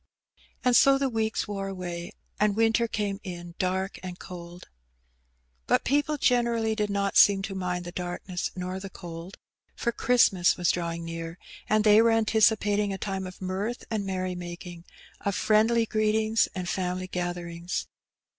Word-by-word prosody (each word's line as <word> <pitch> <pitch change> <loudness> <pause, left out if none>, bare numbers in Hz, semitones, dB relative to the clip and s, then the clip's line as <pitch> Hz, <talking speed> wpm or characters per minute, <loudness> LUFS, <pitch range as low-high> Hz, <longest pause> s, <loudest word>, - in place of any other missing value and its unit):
And 250 -1 +4
so 275 +2 +6
the 270 -1 0
weeks 220 -2 -1
wore 195 -1 -3
away^ 175 -1 -5 0.3
and 210 -1 +3
winter 225 +1 +3
came 205 -3 -2
in 175 -3 -7
dark 190 0 -1
and 180 -1 -7
cold. 175 -1 -10 1.0
But - - +3
people 290 +3 +1
generally 235 -4 +2
did 210 -1 -1
not 200 0 0
seem 195 -1 +6
to 195 - -4
mind 180 -2 -3
the 175 - -6
darkness 180 0 -4
nor 185 +1 -4
the 195 0 -7
cold^ 175 0 -9 0.4
for 235 - -1
Christmas 230 -7 +3
was 175 -2 +3
drawing 170 -1 -3
near^ 165 0 -5 0.3
and 215 0 +3
they 210 0 +7
were 230 - +4
anticipating 215 -2 +3
a 195 - -3
time 190 -1 -3
of 185 +1 -10
mirth 195 +6 -3
and 215 -2 -1
merrymakings 180 -2 -5 0.3
of 200 -1 -2
friendly 225 +2 +3
greetings 215 0 +2
and 180 -1 -3
family 185 0 -2
gatherings. 175 -1 -4
195 Hz, 155 wpm, -27 LUFS, 180-220 Hz, 1.0 s, they